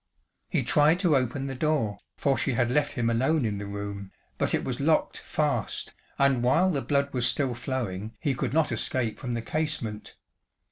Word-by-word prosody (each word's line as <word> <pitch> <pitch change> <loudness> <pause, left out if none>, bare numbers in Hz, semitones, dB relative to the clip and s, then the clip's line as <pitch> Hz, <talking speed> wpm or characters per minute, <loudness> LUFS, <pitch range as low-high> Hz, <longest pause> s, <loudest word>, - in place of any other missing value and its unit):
He - - +1
tried 150 +3 +4
to 170 -6 +4
open 130 +1 0
the 135 - -3
door, 135 -6 0 0.2
for 140 -1 +2
she 135 - 0
had 120 0 +1
left 145 +2 +1
him 120 -4 0
alone 130 +5 +2
in 105 -2 -2
the 100 - -5
room, 100 -1 -6 0.3
but - - +2
it - - -2
was - - -3
locked - - +2
fast, - - -1 0.2
and 140 -3 +3
while 170 +10 +3
the 140 -5 -1
blood 140 0 0
was 125 -2 +2
still 135 -4 0
flowing 115 -5 -4
he 140 - 0
could 130 - -2
not 160 +1 +2
escape 120 -4 -1
from 125 -2 -3
the 115 - -3
casement. 130 -7 -3
130 Hz, 190 wpm, -27 LUFS, 115-145 Hz, 0.3 s, tried